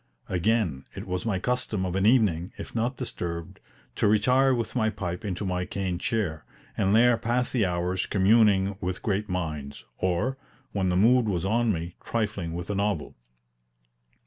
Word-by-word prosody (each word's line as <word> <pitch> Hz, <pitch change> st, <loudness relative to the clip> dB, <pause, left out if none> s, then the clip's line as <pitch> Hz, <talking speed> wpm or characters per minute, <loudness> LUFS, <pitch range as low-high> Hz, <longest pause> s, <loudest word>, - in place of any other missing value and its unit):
Again, 90 Hz, -, 0 dB
it -, -, -6 dB
was 90 Hz, +4 st, -3 dB
my 100 Hz, -4 st, +1 dB
custom 105 Hz, -2 st, -1 dB
of 90 Hz, -1 st, -3 dB
an 95 Hz, +2 st, +2 dB
evening, 100 Hz, -8 st, +3 dB
if -, -, -8 dB
not 120 Hz, +3 st, -1 dB
disturbed, 85 Hz, -1 st, -4 dB, 0.4 s
to -, -, +3 dB
retire 125 Hz, +6 st, +4 dB
with 115 Hz, -2 st, -1 dB
my 110 Hz, -3 st, +2 dB
pipe 90 Hz, -4 st, -4 dB
into 100 Hz, -1 st, -3 dB
my 90 Hz, -1 st, -1 dB
cane 90 Hz, -2 st, -3 dB
chair, 95 Hz, -8 st, -1 dB, 0.3 s
and 100 Hz, +1 st, +2 dB
there 120 Hz, +1 st, +5 dB
pass 120 Hz, +2 st, 0 dB
the 110 Hz, -7 st, +2 dB
hours 90 Hz, +1 st, -1 dB
communing 100 Hz, -1 st, +4 dB
with 90 Hz, +1 st, -3 dB
great 105 Hz, 0 st, -1 dB
minds, 75 Hz, -6 st, -4 dB
or, 105 Hz, +10 st, 0 dB, 0.3 s
when 95 Hz, -2 st, 0 dB
the 90 Hz, -, +1 dB
mood 115 Hz, +3 st, +4 dB
was 90 Hz, -2 st, -1 dB
on 115 Hz, +3 st, +2 dB
me, 85 Hz, -1 st, -4 dB
trifling 105 Hz, -7 st, -2 dB
with 90 Hz, +3 st, -4 dB
a -, -, -2 dB
novel. 100 Hz, -5 st, -1 dB
100 Hz, 170 wpm, -27 LUFS, 90-115 Hz, 0.4 s, there